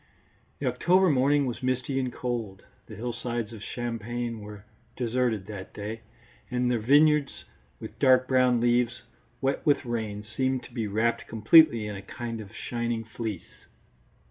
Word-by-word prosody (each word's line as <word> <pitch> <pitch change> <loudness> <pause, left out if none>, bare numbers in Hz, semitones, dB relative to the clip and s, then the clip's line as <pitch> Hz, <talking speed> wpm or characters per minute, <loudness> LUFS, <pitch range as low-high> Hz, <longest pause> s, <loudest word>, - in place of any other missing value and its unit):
The 140 - -5
October 175 +9 +3
morning 140 +1 +3
was 125 -3 -4
misty 130 +1 -1
and 130 -2 -2
cold. 115 -6 -4 0.2
The - - -9
hillsides 120 -1 -4
of 110 - -9
Champagne 120 0 -4
were 105 -1 -10 0.3
deserted 120 -4 0
that 100 -3 -9
day, 110 +2 -5 0.5
and 125 0 0
their 120 - +1
vineyards 145 +4 +3 0.3
with - - -10
dark 130 -1 +5
brown 125 -2 +3
leaves, 120 0 +1 0.4
wet 135 +1 0
with 145 -2 +2
rain, 110 -3 -3
seemed 130 +4 -1
to - - -13
be 115 -4 -2
wrapped 110 +3 0
completely 115 +1 +5
in 105 -1 -5
a 95 - -7
kind 120 -1 -6
of 100 -2 -11
shining 120 -1 -3
fleece. 110 -4 -7
120 Hz, 150 wpm, -27 LUFS, 110-130 Hz, 0.5 s, dark